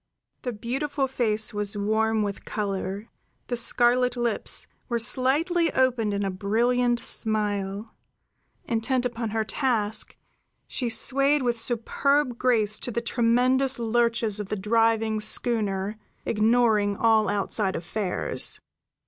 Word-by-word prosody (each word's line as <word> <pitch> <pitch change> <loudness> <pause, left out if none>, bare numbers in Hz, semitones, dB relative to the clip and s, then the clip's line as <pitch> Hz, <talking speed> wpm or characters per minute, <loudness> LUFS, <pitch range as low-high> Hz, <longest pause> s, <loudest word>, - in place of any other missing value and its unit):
The 250 - -3
beautiful 270 +6 -2
face 220 -5 0
was 205 0 -1
warm 220 +1 +1
with 200 -1 -4
color; 200 0 -4 0.4
the 245 - 0
scarlet 245 +1 +2
lips 240 -3 +1 0.2
were 240 - 0
slightly 295 +8 +2
opened 250 -5 +1
in 200 0 -2
a 195 - -1
brilliant 240 +5 +1
smile; 210 -2 -1 0.7
intent 245 +2 -1
upon 230 -2 -3
her 220 +1 -1
task, 220 -4 -1 0.5
she 245 -3 -3
swayed 275 +4 +3
with 240 -2 0
superb 250 +3 0
grace 220 -4 +1
to - - -4
the 235 - -2
tremendous 250 +3 +2
lurches 230 -2 0
of 205 -2 -5
the - - -1
driving 225 +1 +1
schooner, 210 -2 -1 0.3
ignoring 215 -2 +2
all 220 -2 +3
outside 205 0 -1
affairs. 180 +2 -1
225 Hz, 120 wpm, -25 LUFS, 210-245 Hz, 0.7 s, swayed